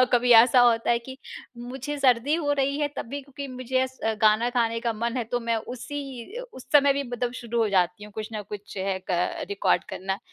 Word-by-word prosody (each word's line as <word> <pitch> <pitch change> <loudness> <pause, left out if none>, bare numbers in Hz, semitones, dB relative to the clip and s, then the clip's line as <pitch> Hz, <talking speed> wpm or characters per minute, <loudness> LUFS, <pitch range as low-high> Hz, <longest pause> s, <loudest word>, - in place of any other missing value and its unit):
अ, - - +7
कभी 245 0 +5
ऐसा 235 +2 +7
होता 235 -1 +4
है 235 - +3
कि 260 +3 -10 0.4
मुझे 265 +4 -5
सर्दी 260 +2 +3
हो 295 -4 0
रही 280 +1 0
है 295 - +1
तब - - -4
भी 285 +3 -4
क्योंकि 280 +1 -8
मुझे 255 0 -1
एस 260 0 -5 0.2
गाना 215 +2 +4
गाने 230 -1 +1
का 235 0 -1
मन 235 +3 -3
है 245 - -1
तो 245 +2 -2
मैं 230 -1 0
उसी 260 - -7
अ, - - -5
उस 260 - -12
समय 285 -1 +6
भी 280 +1 -1
मतलब 245 -1 -3
शुरू 235 0 -3
हो 215 - +1
जाती 185 +1 +1
हूँ 210 - -13
कुछ 215 0 -5
न 215 -1 -4
कुछ 205 -1 -8
है 190 0 -1
क 180 0 -1
रिकॉर्ड 200 -1 +1
करना। 190 +1 -3
240 Hz, 230 wpm, -25 LUFS, 220-265 Hz, 0.4 s, अ